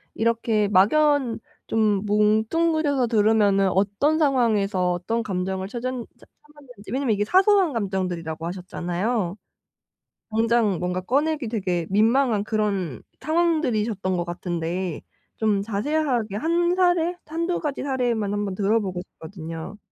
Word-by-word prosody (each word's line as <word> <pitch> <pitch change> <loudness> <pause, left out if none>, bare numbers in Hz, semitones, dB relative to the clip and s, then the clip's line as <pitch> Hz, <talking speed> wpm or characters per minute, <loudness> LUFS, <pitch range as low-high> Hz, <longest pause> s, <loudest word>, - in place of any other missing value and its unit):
이렇게 225 -2 +1
막연 255 +6 +3 0.3
좀 210 -2 +1
뭉뚱그려서 250 +7 +2
들으면은 210 -3 +3
어떤 205 - +1
상황에서 215 - +2
어떤 225 +7 -2
감정을 190 -1 -3
찾았 245 +3 -3
찾았는지 255 -1 -13
왜냐하면 260 -3 +1
이게 205 0 0
사소한 380 - +4
감정들이라고 180 -7 -3
하셨잖아요. 180 +3 -3 0.9
당장 225 -4 +2
뭔가 180 +1 -1
꺼내기 285 +6 0
되게 185 -7 -2
민망한 225 +2 +3
그런 200 - -2 0.2
상황들이셨던 245 - 0
것 175 - -1
같은데 175 0 -3 0.4
좀 210 -3 +1
자세하게 230 0 -1
1 345 +7 +1
사례, 355 -2 +2
1-2 335 +3 -2
가지 295 -3 -3
사례만 240 -6 -1
한번 205 -2 -2
들어 215 +3 +2
보고 185 -3 -4
싶거든요. 165 +2 -8
215 Hz, 295 characters per minute, -24 LUFS, 190-270 Hz, 0.9 s, 사소한